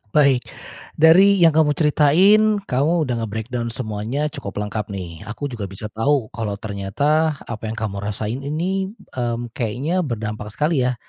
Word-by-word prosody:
Baik, 140 -4 +4 0.5
dari 180 +6 +6
yang 170 -4 +5
kamu 150 -1 +3
ceritain, 195 +8 +4
kamu 155 +4 +1
udah 125 -4 -1
nge-breakdown 115 +2 -3
semuanya 115 +5 -3
cukup 100 - -7
lengkap 105 0 -4
nih. 90 -5 -7
Aku 135 +6 -5
juga 110 -5 -5
bisa 95 +3 -8
tahu 115 +2 0
kalau 110 -3 -3
ternyata 140 +11 0
apa 110 -1 -6
yang 110 - -4
kamu 105 -3 -3
rasain 105 +4 -3
ini, 185 +8 -2 0.2
mmm, 120 -1 -3
kayaknya 130 - -1
berdampak 110 -9 -3
sekali 150 +3 +1
ya, 125 - -1
125 Hz, 150 wpm, -21 LUFS, 110-155 Hz, 0.5 s, dari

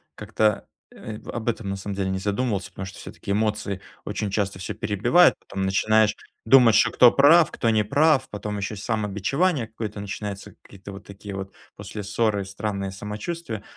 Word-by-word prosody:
как-то, 105 -2 0 0.2
э, 110 -1 -8
в - - -13
об 120 -1 -5
этом, 110 -3 -3
на 100 - -2
самом 100 0 -5
деле, 95 -1 -1
не 95 - -2
задумывался, 100 +1 -1
потому 95 - -7
что, 95 - -10
всё-таки, 100 - -7
эмоции 105 -2 -1 0.3
очень 105 - -3
часто 100 -2 -1
всё 90 - -5
перебивают. 120 - +3
Потом 95 0 -4
начинаешь 110 +2 +3 0.3
думать, 120 -2 +6
что, 110 - +4
кто 125 -1 +7
прав, 155 +4 +6
кто 115 - 0
не 110 -1 +3
прав. 140 +4 +3
Потом 105 0 -5
еще 100 +2 -4
самобичевание 110 - -1
какое-то 110 -2 -6
начинается, 100 0 -6
какие-то 100 0 -12
вот 100 +1 -11
такие 100 0 -9
вот, 95 0 -6 0.2
после 105 - -7
ссоры, 105 0 0
странные 100 0 -4
самочувствия. 105 - -6
105 Hz, 175 wpm, -24 LUFS, 100-115 Hz, 0.3 s, кто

